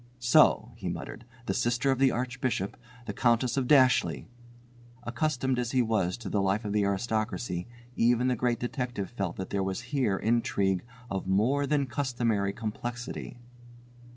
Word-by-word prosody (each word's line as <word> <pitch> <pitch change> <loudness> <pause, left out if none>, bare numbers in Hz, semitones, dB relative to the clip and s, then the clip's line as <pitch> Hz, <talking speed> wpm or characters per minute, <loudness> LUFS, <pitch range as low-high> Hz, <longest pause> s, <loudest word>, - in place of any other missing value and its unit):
"So," 120 -1 +4
he - - -4
muttered, 115 - -6 0.2
"the - - -1
sister 120 +3 +1
of 135 - 0
the 135 0 +5
Archbishop, 125 -5 -2 0.3
the - - -4
Countess 120 +1 +2
of 135 -2 0
Dashleigh!" 130 -3 +4 0.8
Accustomed 130 +1 0
as 120 0 -2
he 130 -1 +4
was 105 -6 0
to 115 -4 -8
the 100 - 0
life 100 +3 0
of 105 - -2
the 105 -1 +2
aristocracy, 110 -2 -2 0.3
even 120 +1 +3
the 125 - +2
Great 120 0 0
Detective 120 -5 -3
felt 95 -7 -3
that 95 - -6
there 100 - 0
was 95 +2 -2
here 120 -9 +2
intrigue 100 -5 +1 0.3
of 95 -1 -3
more 125 +9 +2
than 145 -1 +2
customary 120 -6 0
complexity. 120 +4 -5
120 Hz, 155 wpm, -29 LUFS, 100-125 Hz, 0.8 s, the